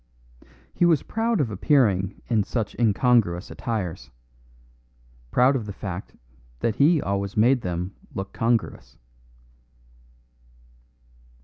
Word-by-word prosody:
He - - 0
was 165 -5 +4
proud 225 -1 -1
of 130 -7 0
appearing 100 -4 +1
in 115 -3 +2
such 110 -1 -3
incongruous 110 -5 +2
attires 90 - -4 1.2
proud 125 - +4
of 115 -5 -3
the 100 - -5
fact 95 -2 -7 0.5
that 115 0 0
he 155 +3 +4
always 100 -3 -3
made 125 +4 +4
them 90 0 -4 0.2
look 95 0 -5
congruous. 115 -1 -1
110 Hz, 105 wpm, -24 LUFS, 95-130 Hz, 1.2 s, was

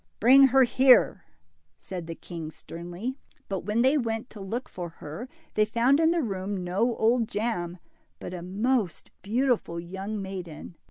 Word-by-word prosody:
Bring 270 +4 +8
her 265 +1 +5
here! 255 - +5 0.3
" 80 0 -46
said 175 - -7
the 165 - -5
king, 165 -3 -7
sternly. 175 - -7 0.3
But 195 -2 -2
when 215 +3 +1
they 275 +3 +4
went 225 -1 -3
to 215 - -11
look 230 +7 -4
for 175 -2 -6
her, 165 - -8 0.2
they 215 - +3
found 235 +6 +3
in 325 0 +4
the 335 -2 +1
room 195 -3 -3
no 205 +7 0
Old 230 +1 +2
Jam, 195 -6 -2 0.4
but - - -7
a 180 - -5
most 205 +1 -1
beautiful 225 -4 0
young 190 +5 -5
maiden. 185 -4 -7
205 Hz, 165 wpm, -27 LUFS, 175-245 Hz, 0.4 s, Bring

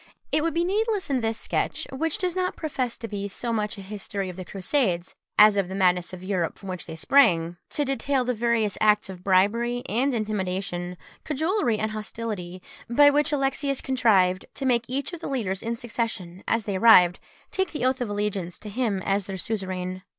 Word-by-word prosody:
It 305 - +3
would 330 0 -1
be 340 - +2
needless 410 -1 0
in 260 -2 +1
this 225 0 -1
sketch, - - -2
which 305 +4 -1
does 365 -2 -1
not 370 0 -1
profess 260 -6 -3
to 230 - -6
be 200 -2 -4
so 230 +4 -3
much 210 -1 -2
a - - -7
history 200 -1 -5
of 180 - -7
the 185 - -6
Crusades, 185 - 0 0.2
as 210 -1 +7
of 195 -2 +1
the 190 - -6
madness 180 -2 +2
of 185 0 -9
Europe, 185 -4 -1
from 195 - -9
which 185 -1 -5
they 160 - -6
sprang, 170 - +3
to 295 - 0
detail 275 -1 0
the 250 - +1
various 225 -3 0
acts 210 -2 +3
of 180 -1 -11
bribery 230 +6 +2
and 255 +4 +1
intimidation, 185 -4 -2 0.3
cajolery 310 - 0
and 220 0 -1
hostility, 210 -4 -5 0.3
by 285 +4 +6
which 295 +1 +2
Alexius 275 -1 0
contrived 200 -8 +2
to 270 - -4
make 240 -2 +1
each 275 +6 -2
of 345 - -6
the 330 - -5
leaders 200 -9 -2
in 230 +1 -2
succession, 220 -6 -4
as 225 -2 +1
they 200 -2 -1
arrived, 185 -5 +7 0.3
take 380 -2 0
the 300 -5 -2
oath 260 0 +1
of 240 - -1
allegiance 205 -4 -2
to 210 - -9
him 205 -4 -1
as 195 0 0
their 195 -1 -4
suzerain. 185 -3 -3
215 Hz, 200 wpm, -25 LUFS, 190-265 Hz, 0.3 s, as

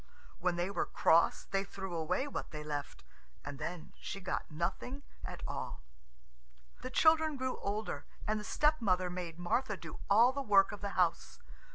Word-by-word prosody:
When 180 0 +1
they 175 +3 -1
were 185 - 0
cross 165 +1 +4
they 195 0 -1
threw 190 -2 -6
away 165 - 0
what 285 - -4
they 150 -1 -6
left, 145 -2 -4 0.4
and 140 - -6
then 175 -2 -5
she 195 - -5
got 190 - -3
nothing 170 - -3 0.2
at - - -6
all. - - -5 1.0
The 255 - -4
children 315 +1 +4
grew 260 0 -2
older, 200 -7 -3 0.2
and 215 0 +1
the - - -6
stepmother 210 - +2
made 175 -2 -5
Martha 210 +5 0
do 165 -3 -9
all 230 +5 +7
the 280 - -2
work 200 -5 +5
of 205 - -7
the 200 -1 -4
house. 175 -2 +1
195 Hz, 170 wpm, -34 LUFS, 175-245 Hz, 1.0 s, all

